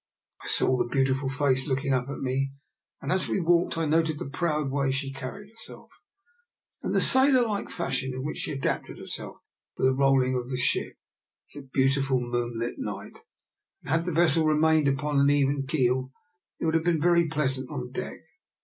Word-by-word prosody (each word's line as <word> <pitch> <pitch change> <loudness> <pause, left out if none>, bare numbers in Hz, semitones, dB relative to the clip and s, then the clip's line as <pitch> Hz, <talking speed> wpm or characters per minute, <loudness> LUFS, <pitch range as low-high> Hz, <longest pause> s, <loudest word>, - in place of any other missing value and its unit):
I - - -8
saw 130 - +2
the 120 - -1
beautiful 135 0 +1
face 135 -1 0
looking 140 0 0
up 130 0 -1
at 140 - -5
me, 135 +1 -1 0.5
and - - -2
as 185 +1 +1
we - - 0
walked 170 -1 +2
I 165 - 0
noted 160 0 +1
the - - -5
proud 150 -3 -1
way 140 -1 0
she 135 0 -3
carried 135 +10 -8
herself, 225 0 -12 0.9
and - - -2
the - - +4
sailor 260 -2 +5
like 205 -2 -3
fashion 130 -6 -2
in 130 0 -5
which 150 - -4
she - - -3
adapted 135 -1 -3
herself - - -7 0.4
to - - -4
the 130 0 +4
rolling 135 -1 +3
of 125 -1 -3
the 130 - -2
ship. 125 - 0 0.6
It - - -12
was 140 - -12
a - - -22
beautiful 135 0 +2
moonlight 120 -1 -3
night, - - -6 0.6
and - - -6
had 165 +1 +1
the 180 - -1
vessel 160 -1 +3
remained 155 -1 +3
upon 140 +1 0
an 140 0 +4
even 140 -1 +1
keel, 130 -2 +1 0.5
it - - -2
would 160 - +1
have 165 0 +2
been 170 -2 +1
very 170 +1 +3
pleasant 135 -4 -1
on 125 -4 -5
deck. - - -6
140 Hz, 195 wpm, -27 LUFS, 130-160 Hz, 0.9 s, sailor